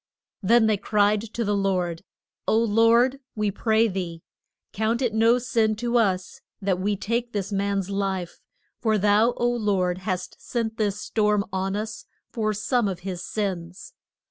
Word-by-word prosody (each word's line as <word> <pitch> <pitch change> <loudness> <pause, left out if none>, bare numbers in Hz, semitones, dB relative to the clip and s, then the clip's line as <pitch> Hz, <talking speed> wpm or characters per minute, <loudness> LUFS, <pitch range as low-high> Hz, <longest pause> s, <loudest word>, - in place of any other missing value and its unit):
Then 225 +3 +4
they 215 -1 +3
cried 205 +1 +2
to 230 +1 -4
the 205 0 +1
Lord, 180 -4 -1 0.4
O 220 - +3
Lord, 230 +4 +4 0.2
we 210 -2 0
pray 220 +2 +2
thee, 180 -5 -4 0.5
count 220 +3 0
it 245 -4 0
no 225 +2 +4
sin 230 -3 +1
to 240 +2 -2
us 190 -4 -1 0.2
that 190 -2 0
we 205 +2 0
take 235 +4 -2
this 200 -1 -3
man's 200 -1 -1
life, 195 -3 -2 0.4
for 220 -2 +2
thou, 210 +4 +3
O 240 - +1
Lord, 200 -7 0
hast 185 -1 -4
sent 225 -2 -3
this 205 -2 0
storm 210 -2 +1
on 190 +1 -1
us 215 +1 -5 0.3
for 215 -2 0
some 220 +2 0
of 185 -3 -4
his 180 -1 -5
sins. 185 -3 -4
210 Hz, 160 wpm, -25 LUFS, 195-225 Hz, 0.5 s, Then